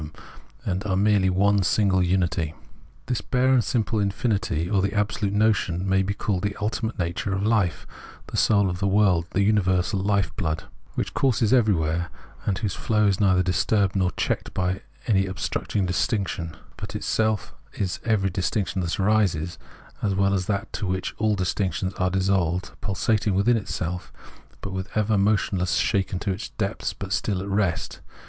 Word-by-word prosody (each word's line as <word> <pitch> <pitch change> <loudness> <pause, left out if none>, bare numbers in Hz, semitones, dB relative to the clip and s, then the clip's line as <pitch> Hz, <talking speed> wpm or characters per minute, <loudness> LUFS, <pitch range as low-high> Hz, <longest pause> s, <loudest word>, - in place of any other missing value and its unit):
them, 75 0 -7 0.5
and 95 +2 -1
are 95 - +1
merely 100 -1 +3
one 100 +2 +3
single 95 0 +2
unity. 85 -3 0 0.5
This 125 - -1
bare 130 +1 +2
and 125 -3 +4
simple 115 -3 0
infinity, 100 -5 0
or 100 0 +2
the 100 +3 -1
absolute 105 0 0
notion, 100 -4 +1
may 95 0 +3
be 100 +1 -1
called 100 -3 -1
the 100 0 -2
ultimate 110 +1 -2
nature 85 +2 -2
of 100 - -2
hfe, 105 -6 +1 0.4
the - - -8
soul 100 -2 +4
of 90 -1 -3
the 100 - +1
world, 95 -4 +3
the 100 - +1
universal 95 -2 +2
hfe 100 -2 +1
blood, 80 -6 -2 0.3
which - - -2
courses 120 -3 +2
every 110 -6 +4
where, 80 +2 -1 0.4
and 95 - +1
whose 105 -3 -2
flow 105 -1 +1
is 100 -2 +2
neither 95 -3 +4
disturbed 100 +2 +1
nor 95 -2 +2
checked - - -2
by 95 +1 -1 0.2
any 95 -4 +2
obstructing 95 +1 -2
distinction, 90 -3 -1 0.2
but - - -7
is - - -3
itself 110 -2 0 0.5
every 100 -4 +1
distinction 95 +2 -1
that 85 +2 -2
arises, 95 -5 +1 0.4
as 100 -2 0
well 100 0 +2
as 95 -2 -1
that 100 -2 0
into 100 - -3
which 95 0 -2
all 110 -1 +2
distinctions 95 -1 -1
are 95 -1 0
dissolved; 95 -2 0
pulsating 105 +1 0
within 100 +5 +3
itself, 90 -4 -3 0.5
but 100 - -5 0.2
ever 110 0 +2
motionless, 95 -3 +1
shaken 95 -1 +1
to 95 - -2
its 95 +3 -4
depths, 105 0 -2
but 95 -1 -5
still 95 +1 0
at 95 - -5
rest. 95 -4 -1
95 Hz, 170 wpm, -25 LUFS, 90-105 Hz, 0.5 s, and